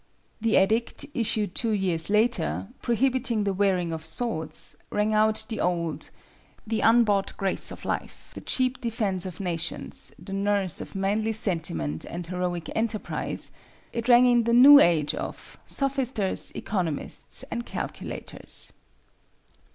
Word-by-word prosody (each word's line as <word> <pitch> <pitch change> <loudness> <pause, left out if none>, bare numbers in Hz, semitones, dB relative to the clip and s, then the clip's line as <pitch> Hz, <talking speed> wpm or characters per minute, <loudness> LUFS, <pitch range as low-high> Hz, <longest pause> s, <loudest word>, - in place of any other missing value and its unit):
The 225 0 +2
edict, 220 +8 +2
issued 215 -5 0
two 230 - +1
years 185 -5 0
later, 215 -1 +1
prohibiting 245 -2 +1
the 200 -1 0
wearing 185 -3 +1
of 160 -1 -5
swords, 160 -8 -1
rang 210 +1 0
out 215 0 +2
the 220 - -4
old, 170 -3 -1 0.6
"the 225 0 -1
unbought 220 -4 +3
grace 195 -1 +1
of - - -9
life, - - -4
the - - -8
cheap 255 0 0
defence 210 -6 -1
of 175 -3 -8
nations, 170 -3 -4
the 195 - -9
nurse 200 -2 0
of - - -9
manly 210 +3 0
sentiment 150 - -2
and 175 0 -6
heroic 175 -1 -3
enterprise," 220 -1 -2 0.4
it 235 +1 -3
rang 245 +1 +8
in 240 -2 +4
the 235 - +2
new 280 +4 +10
age 160 - +3
of - - -7
"sophisters, 265 -7 0
economists, 175 -8 -2
and 235 0 -4
calculators." - - -5
205 Hz, 135 wpm, -26 LUFS, 180-235 Hz, 0.6 s, new